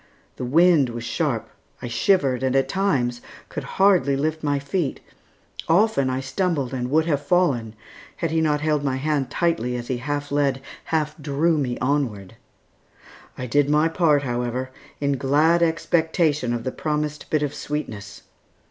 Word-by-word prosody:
The 125 - -4
wind 160 0 +4
was 120 0 -6
sharp. - - -1 0.3
I 125 - -6
shivered, 130 +1 +2
and 130 0 0
at 135 - +3
times 130 -12 0 0.3
could - - -5
hardly 190 -8 +4
lift 155 +3 -1
my 145 -2 0
feet; 140 +2 -2 0.7
often 170 -6 +3
I 130 +1 -1
stumbled 140 -2 -1
and 125 -1 -2
would 160 +3 +3
have 145 -4 0
fallen 140 -10 +1 0.4
had 165 - -2
he 160 0 +1
not 150 -2 +1
held 150 -2 +1
my 135 -2 0
hand 140 -1 -1
tightly, 125 -8 0
as 120 -1 -6
he 130 - 0
half 145 +2 -4
led, 140 -2 +1 0.3
half 155 -2 -1
drew 150 +3 +1
me 130 -5 -1
onward. 125 -9 -1 1.0
I 125 - -4
did 145 +3 +2
my 150 +2 +3
part, 155 -4 +2
however, 125 +1 -2 0.3
in 140 -1 0
glad 150 +6 +3
expectation 160 -4 +1
of 120 -1 -2
the 130 - -2
promised 150 0 -3
bit 155 -1 +1
of 145 - -2
sweetness. 110 -9 -6
145 Hz, 160 wpm, -23 LUFS, 130-160 Hz, 1.0 s, wind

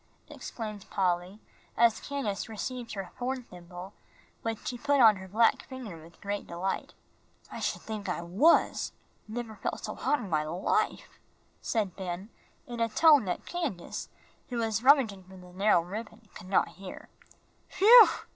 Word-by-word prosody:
exclaimed 215 -4 -7
Polly, 180 +1 -1 0.4
as 230 -1 +4
Candace 255 -7 -3
received 235 +2 -5
her 195 -3 -6
horn 255 +1 -2
thimble, 180 -1 -11 0.5
which 225 -1 -4
she 250 - -2
put 285 +3 +1
on 220 -4 +7
her 190 0 -9
black 230 +7 +3
finger 255 -9 -7
with 165 0 -17
great 200 0 -4
delight. 180 +3 -3 0.6
"I - - -6
sh'd - - -2
think 215 -3 -5
I 175 -1 -2
was. 195 - +3 0.3
Never 220 -1 -6
felt - - -4
so - - -4
hot 295 - +1
in 240 - -6
my 155 -4 +1
life," 185 - -1 0.4
said 205 -5 -1
Ben, 185 +1 -5 0.4
in 240 -1 -7
such 230 -1 +1
a - - -19
tone 300 -7 +6
that 180 -2 -3
Candace, 310 - -4 0.4
who 245 - -3
was 225 -1 0
rummaging 245 -8 +4
for 190 +1 -14
the 180 -1 -14
narrow 195 -1 +4
ribbon, 220 +3 -8
could 180 - -11
not 195 - +3
hear. 190 0 -10 0.7
"Whew!" 455 +3 +10
215 Hz, 160 wpm, -29 LUFS, 185-245 Hz, 0.7 s, Whew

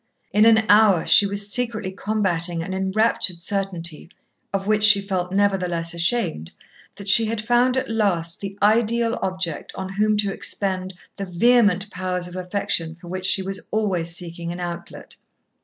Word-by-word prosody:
In 210 +1 +3
an 220 -1 +4
hour, 205 -5 +4
she 200 - +6
was 200 +1 -2
secretly 230 -5 0
combating 185 -5 -2
an 190 +2 -6
enraptured 190 0 +1
certainty, 170 -3 -4 0.4
of 195 -1 -3
which 210 0 +1
she 210 -1 +8
felt 185 -3 -4
nevertheless 185 -4 0
ashamed, 170 - -1 0.4
that 200 0 -11
she 225 +3 +7
had 225 0 -3
found 240 +3 +1
at 260 - -2
last 180 -7 -1
the 195 0 -7
ideal 230 +2 +1
object 185 -4 -4
on 190 -1 -6
whom 210 +1 +1
to 200 -2 -1
expend 185 -2 -1 0.2
the 200 - -4
vehement 205 +1 +2
powers 180 -1 -3
of 180 - -10
affection 180 -3 -3
for 175 0 -14
which 185 +1 -4
she 190 - +1
was 195 0 -4
always 190 -6 -1
seeking 170 0 -4
an 175 - -7
outlet. 175 -1 -8
195 Hz, 160 wpm, -21 LUFS, 175-215 Hz, 0.4 s, she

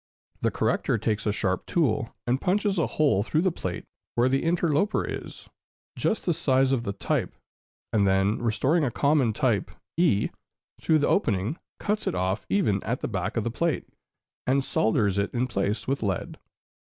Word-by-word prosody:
The - - +2
corrector - - 0
takes 110 0 -1
a - - +3
sharp 95 -3 -1
tool, 125 -8 0
and 125 +2 0
punches 200 0 +1
a 165 - +2
hole 145 -10 +2
through 155 +10 0
the 185 - +3
plate 95 - -5 0.3
where 120 +2 +3
the 135 +1 +2
interloper 170 +3 +1
is, - - -7 0.5
just 220 - -1
the 175 - +2
size 135 -3 +2
of 130 -3 +2
the 100 - -1
type, - - -2 0.6
and 100 -3 +3
then 95 +2 +2
restoring 135 +8 +2
a 135 - +2
common 140 -1 +2
type 115 -3 0 0.3
e, 165 - +3 0.5
through 160 - +3
the 145 - +1
opening, 110 - +1 0.2
cuts 210 +1 -2
it - - 0
off 95 +3 -1
even 105 - +2
at 120 +2 -2
the - - -1
back 100 -1 -3
of 115 - +1
the 115 - -2
plate, 165 +4 -1 0.6
and 135 +1 +3
solders 105 -5 +1
it 100 - -1
in 120 - +1
its 130 - -4
place 100 +2 -1
with 135 +1 0
lead. 100 -5 -2
125 Hz, 180 wpm, -26 LUFS, 105-155 Hz, 0.6 s, a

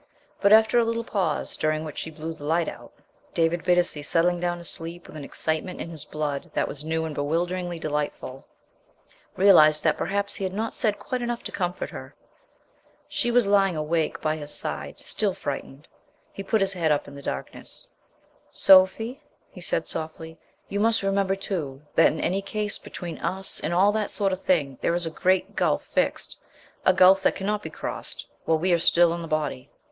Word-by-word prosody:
But, 200 - +4
after 220 +2 +6
a - - +4
little 230 0 -1
pause, 190 -9 -1
during 155 0 0
which 150 - -6
she - - -4
blew 160 +1 -6
the 160 - -13
light 165 +3 +1
out, - - -8 0.4
David 165 +1 +1
Bittacy 175 -4 +2
settling 175 +3 +2
down 175 0 -1
to 170 - -10
sleep 170 +1 -5
with - - -13
an 150 - -7
excitement 160 +5 -2
in 170 - -5
his 155 -4 -7
blood 150 -2 -3
that - - +1
was 145 +1 -7
new 160 +1 -1
and 160 - -4
bewilderingly 175 +4 -1
delightful, 150 -4 -4 0.9
realized 155 -6 +6
that - - +2
perhaps 200 0 -1
he - - +2
had 190 0 -2
not 225 +2 -2
said 215 -4 +2
quite 255 -1 -4
enough 240 0 -3
to - - -5
comfort 180 -1 -3
her. - - -9 0.9
She 240 - -1
was 240 -1 +4
lying 195 -3 +3
awake 155 +1 -1
by 155 0 0
his 145 -1 -6
side, - - -4
still - - 0
frightened. 140 +3 -6 0.5
He - - -6
put 210 +2 +1
his 195 0 +2
head 165 -4 +1
up 145 - +1
in 140 - -10
the 140 - -9
darkness. 65 - -5 0.6
"Sophie," 195 +7 +5 0.3
he - - -11
said - - -1
softly, 160 +1 -6 0.3
"you 200 - -3
must 225 0 +2
remember, 195 0 +1
too, 165 -9 -4
that - - +5
in 155 - -5
any 190 +3 0
case 210 +1 -2
between 175 -2 -7
us 190 +1 -2
and - - -5
and 165 - -1
all 195 +3 +5
that 215 -1 -1
sort 200 -2 0
of 185 - -4
thing 145 -8 +1
there 170 - +1
is 175 0 -1
a 165 - -3
great 185 +3 +1
gulf - - +1
fixed, - - -1 0.5
a - - +8
gulf 185 +1 +6
that - - +2
cannot 205 +2 -1
be - - -6
crossed - - -6
er - - -35
while 160 - +3
we 175 +3 +1
are 170 - +3
still 170 0 +4
in 170 - -4
the 165 - -6
body." 150 -5 -2
175 Hz, 200 wpm, -25 LUFS, 155-195 Hz, 0.9 s, a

